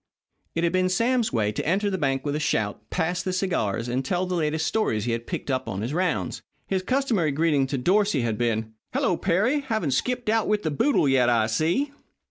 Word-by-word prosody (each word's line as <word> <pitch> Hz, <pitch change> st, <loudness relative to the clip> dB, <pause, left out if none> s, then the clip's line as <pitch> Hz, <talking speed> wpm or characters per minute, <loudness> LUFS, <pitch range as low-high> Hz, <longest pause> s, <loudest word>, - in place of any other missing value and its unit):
It 165 Hz, -, 0 dB
had 170 Hz, 0 st, +1 dB
been 185 Hz, 0 st, +2 dB
Sam's 230 Hz, +5 st, +1 dB
way 105 Hz, -3 st, +1 dB
to 105 Hz, -, -3 dB
enter 200 Hz, +5 st, +1 dB
the 190 Hz, -, -1 dB
bank 135 Hz, -2 st, 0 dB
with 145 Hz, 0 st, -1 dB
a -, -, -1 dB
shout, 105 Hz, -8 st, -1 dB
pass 175 Hz, +1 st, -1 dB
the 185 Hz, -, -2 dB
cigars, 170 Hz, -, -1 dB
and 125 Hz, +2 st, -1 dB
tell 175 Hz, +7 st, 0 dB
the 185 Hz, -, -3 dB
latest 160 Hz, -2 st, 0 dB
stories 115 Hz, -, 0 dB
he 120 Hz, -, 0 dB
had 115 Hz, 0 st, -3 dB
picked -, -, -3 dB
up 130 Hz, 0 st, -1 dB
on 95 Hz, -, -3 dB
his 120 Hz, +6 st, -3 dB
rounds. 180 Hz, +1 st, -1 dB, 0.2 s
His 190 Hz, -1 st, -1 dB
customary 230 Hz, -, +1 dB
greeting 145 Hz, -2 st, +2 dB
to 135 Hz, -, -2 dB
Dorsey 185 Hz, +2 st, +2 dB
had 115 Hz, -2 st, -1 dB
been, 110 Hz, -1 st, -1 dB, 0.2 s
"Hello, 180 Hz, -, +2 dB
Perry! 200 Hz, -, +1 dB
Haven't 220 Hz, -, -1 dB
skipped 250 Hz, -, -1 dB
out 220 Hz, 0 st, +2 dB
with 210 Hz, 0 st, +1 dB
the 155 Hz, -, -1 dB
boodle 155 Hz, -, +2 dB
yet, 130 Hz, -2 st, +4 dB
I 115 Hz, -2 st, +3 dB
see." 165 Hz, -, 0 dB
160 Hz, 220 wpm, -25 LUFS, 125-195 Hz, 0.2 s, yet